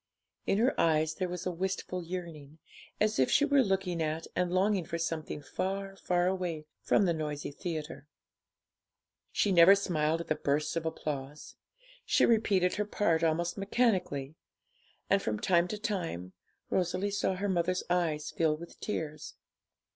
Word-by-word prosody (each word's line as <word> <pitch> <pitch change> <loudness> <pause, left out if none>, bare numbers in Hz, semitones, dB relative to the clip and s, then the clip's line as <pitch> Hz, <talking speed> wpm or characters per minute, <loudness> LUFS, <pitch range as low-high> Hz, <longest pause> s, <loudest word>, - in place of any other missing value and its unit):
In 195 - +2
her 245 +5 +3
eyes 155 -1 +2
there 185 +2 -3
was 180 0 -5
a 180 - 0
wistful 185 0 -3
yearning, 165 -4 -7 0.4
as 215 -5 +1
if 130 - +4
she 290 - +4
were 285 -2 +4
looking 190 -6 0
at 160 +1 -2
and 180 -1 0
longing 190 +1 +2
for 170 - -4
something 160 -3 -3
far, 195 +4 -3
far 180 -2 0
away 180 -4 -2 0.2
from 205 - +3
the 170 - +2
noisy 150 -2 -4
theatre. 155 -2 -6 1.2
She 205 - +1
never 180 +2 +8
smiled 165 -5 0
at - - -8
the - - +2
bursts 150 +2 -1
of 165 -1 -1
applause; 150 -2 -5 0.5
she - - +3
repeated 200 -6 +2
her 210 - 0
part 170 -6 +1
almost 170 +3 0
mechanically, 195 - 0 0.7
and, - - +3
from 105 -1 -2
time 175 -1 +3
to 210 - -4
time, 175 - -3 0.4
Rosalie 185 +2 0
saw 200 -2 0
her 200 +2 -2
mother's 180 -1 0
eyes 165 -4 0
fill 155 -2 +1
with 170 +2 -11
tears. 155 -7 -4
175 Hz, 155 wpm, -31 LUFS, 155-195 Hz, 1.2 s, never